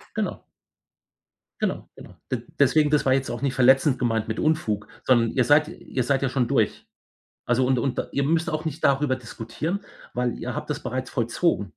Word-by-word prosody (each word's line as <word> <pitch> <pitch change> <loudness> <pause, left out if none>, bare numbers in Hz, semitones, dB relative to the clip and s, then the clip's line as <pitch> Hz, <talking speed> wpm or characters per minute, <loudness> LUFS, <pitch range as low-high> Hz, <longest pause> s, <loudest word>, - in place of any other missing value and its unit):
Genau. - - -2 1.2
Genau, - - -2
genau. - - -13 0.2
D 120 -3 -2 0.2
deswegen, 150 +2 +4
das 150 - +3
war 130 - +3
jetzt 135 -1 -1
auch - - -5
nicht 135 -2 0
verletzend 130 +1 +4
gemeint 115 -3 0
mit 110 - -3
„Unfug“, 135 -10 0 0.2
sondern 120 -3 +4
ihr 130 - +2
seid 145 +4 +5
ihr 130 - -4
seid 135 +1 +1
ja 135 - +2
schon 125 -1 0
durch. - - 0 0.6
Also, 125 +1 +2
und 130 - +2
und 130 +1 0
ihr 140 - 0
müsst 165 +4 +1
auch 155 0 -3
nicht 155 +1 -4
darüber 135 -1 +3
diskutieren, 120 - -4 0.3
weil 125 0 -1
ihr - - -4
habt - - -5
das - - -3
bereits 130 +1 -4
vollzogen. 120 - 0
130 Hz, 190 wpm, -24 LUFS, 120-150 Hz, 1.2 s, seid